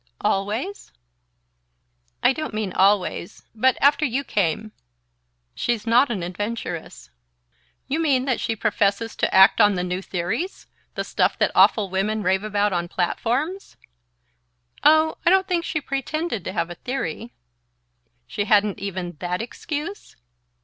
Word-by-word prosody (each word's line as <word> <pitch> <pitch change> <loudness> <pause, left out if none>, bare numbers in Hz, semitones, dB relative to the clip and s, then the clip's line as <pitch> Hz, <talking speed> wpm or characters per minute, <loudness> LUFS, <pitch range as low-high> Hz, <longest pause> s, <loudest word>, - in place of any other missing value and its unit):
"Always?" 210 - -2 1.3
"I - - +5
don't 310 -6 -5
mean 210 -4 -2
always... 190 -2 +1
but 255 +3 +2
after 285 +2 +4
you 270 0 0
came..." 210 - -1 0.8
"She's 235 -3 -2
not 245 +4 +4
an 200 -7 -3
adventuress." 180 - -5 0.8
"You 285 +4 -1
mean 275 -5 +2
that 255 -3 0
she 225 - -1
professes 210 +1 0
to - - 0
act 190 0 +6
on 205 -1 +5
the 180 - -1
new 180 +1 -3
theories? 195 - -3 0.3
The - - -2
stuff - - 0
that - - +2
awful 200 -4 +4
women 210 +3 -1
rave 190 +2 +1
about 205 -1 0
on 175 -1 -1
platforms?" 250 - -2 1.1
"Oh, 315 +1 +4
I - - +4
don't 380 +1 +4
think 350 -2 0
she 310 - -1
pretended 275 - -3
to - - -3
have 175 -3 -2
a - - -6
theory 205 - -4 0.4
" - - -47
"She 205 - -3
hadn't 205 -1 +3
even 185 -4 -5
that 180 0 -2
excuse?" 300 - -6
215 Hz, 145 wpm, -23 LUFS, 190-270 Hz, 1.3 s, act